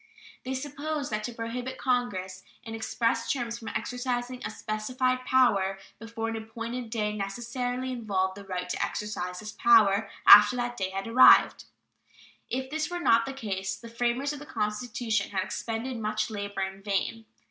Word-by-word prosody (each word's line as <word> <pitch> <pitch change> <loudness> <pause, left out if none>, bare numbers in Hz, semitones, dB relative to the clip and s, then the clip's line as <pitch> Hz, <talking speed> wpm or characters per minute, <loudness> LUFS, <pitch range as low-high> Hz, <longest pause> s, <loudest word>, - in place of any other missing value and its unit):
They 260 +1 -3
supposed 290 +1 -4
that 215 0 -2
to 245 - -4
prohibit 245 +3 -5
Congress 190 -8 -1 0.2
in 225 - -7
express 230 +1 -1
terms 235 -3 -3
from 225 - -10
exercising 250 +1 -3
a - - -3
specified 255 +4 -2
power 200 -8 +3 0.2
before 225 0 -5
an 225 - -3
appointed 230 +2 -5
day 210 -2 -1
necessarily 245 +5 -3
involved 200 -6 -1
the 200 - -9
right 180 -2 -4
to - - -2
exercise 180 -3 -4
this 215 0 -7
power 215 -2 +4 0.2
after 210 +3 +10
that 245 0 -2
day 190 -4 -2
had 195 +3 -4
arrived. 240 +3 +6 0.8
If 260 +2 -3
this 310 +1 -1
were 350 0 -3
not 230 -8 +4
the 270 - -4
case, 195 -6 -3
the 230 +4 -11
framers 245 +4 -1
of 290 - -7
the 295 - -11
Constitution 215 -2 -2
had 190 -2 -1
expended 235 +5 -4
much 215 0 -1
labor 205 -2 -4
in 190 0 -4
vain. 210 +2 -2
230 Hz, 165 wpm, -28 LUFS, 205-250 Hz, 0.8 s, after